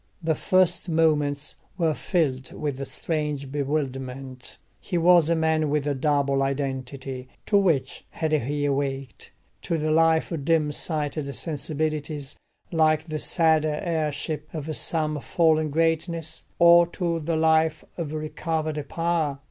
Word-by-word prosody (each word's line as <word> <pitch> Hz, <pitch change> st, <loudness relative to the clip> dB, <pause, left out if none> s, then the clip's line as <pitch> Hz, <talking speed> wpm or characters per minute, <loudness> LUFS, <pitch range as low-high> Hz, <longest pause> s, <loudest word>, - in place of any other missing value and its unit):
The 160 Hz, 0 st, +2 dB
first 180 Hz, +1 st, +2 dB
moments 150 Hz, -3 st, +1 dB, 0.2 s
were 165 Hz, -4 st, +2 dB
filled 140 Hz, -7 st, -1 dB
with 140 Hz, -2 st, -3 dB
strange 150 Hz, -4 st, -3 dB
bewilderment: 135 Hz, -3 st, -4 dB, 0.2 s
he 180 Hz, -, -3 dB
was 170 Hz, -1 st, +5 dB
a 170 Hz, -, +3 dB
man 160 Hz, -1 st, +1 dB
with 145 Hz, -1 st, 0 dB
a 145 Hz, -, +1 dB
double 140 Hz, 0 st, +1 dB
identity; 135 Hz, -1 st, -3 dB, 0.2 s
to 210 Hz, -, 0 dB
which 160 Hz, -9 st, +2 dB
had 160 Hz, -1 st, -2 dB
he 145 Hz, 0 st, 0 dB
awaked? 135 Hz, -1 st, -3 dB, 0.3 s
to 170 Hz, -, -1 dB
the 155 Hz, 0 st, 0 dB
life 160 Hz, +1 st, +3 dB
of 160 Hz, -4 st, -3 dB
dim 155 Hz, -1 st, +2 dB
sighted 150 Hz, -2 st, -2 dB
sensibilities 150 Hz, -1 st, -3 dB, 0.4 s
like 155 Hz, -2 st, +3 dB
the 155 Hz, -1 st, -4 dB
sad 160 Hz, -2 st, +3 dB
heirship 155 Hz, -1 st, -2 dB
of 155 Hz, 0 st, -4 dB
some 155 Hz, -1 st, 0 dB
fallen 155 Hz, -2 st, +2 dB
greatness, 165 Hz, +1 st, 0 dB
or 170 Hz, 0 st, +7 dB
to 170 Hz, -1 st, -2 dB
the 165 Hz, +1 st, -1 dB
life 160 Hz, 0 st, +2 dB
of 165 Hz, -4 st, -4 dB
recovered 155 Hz, 0 st, -2 dB
power? 165 Hz, -4 st, 0 dB
155 Hz, 130 wpm, -25 LUFS, 145-165 Hz, 0.4 s, or